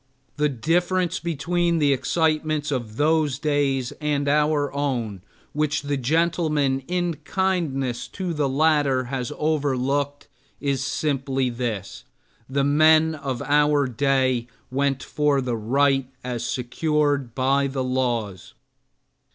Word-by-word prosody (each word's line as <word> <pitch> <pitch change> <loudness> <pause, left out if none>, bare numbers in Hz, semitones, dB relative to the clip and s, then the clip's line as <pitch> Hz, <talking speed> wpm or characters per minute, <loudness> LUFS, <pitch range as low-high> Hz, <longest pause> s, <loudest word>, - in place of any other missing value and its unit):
The 150 0 +2
difference 175 +6 0
between 170 +1 0
the 145 -3 +3
excitements 155 +1 0
of 120 -5 -3
those 150 -3 +2
days 140 -4 0
and 145 -1 0
our 150 -1 +2
own, 120 -9 -2 0.3
which 150 -1 0
the 145 0 -1
gentleman 150 -1 +1
in 175 -2 -1
kindness 155 -7 -1
to 185 -3 -4
the 150 -3 0
latter 145 -2 +2
has 125 -1 -2
overlooked, 145 -2 -1 0.3
is 140 -2 -1
simply 135 -2 -1
this: 115 -5 -4 0.5
the 140 +1 +1
men 155 +2 +5
of 135 -5 -4
our 145 0 +3
day 130 -1 +1 0.2
went 135 0 0
for 150 -1 +1
the 125 -3 -1
right 135 +4 +2 0.2
as 125 -2 -3
secured 140 +1 -1
by 135 +1 +2
the 135 -1 -2
laws. 120 -7 -2
140 Hz, 120 wpm, -23 LUFS, 130-155 Hz, 0.5 s, men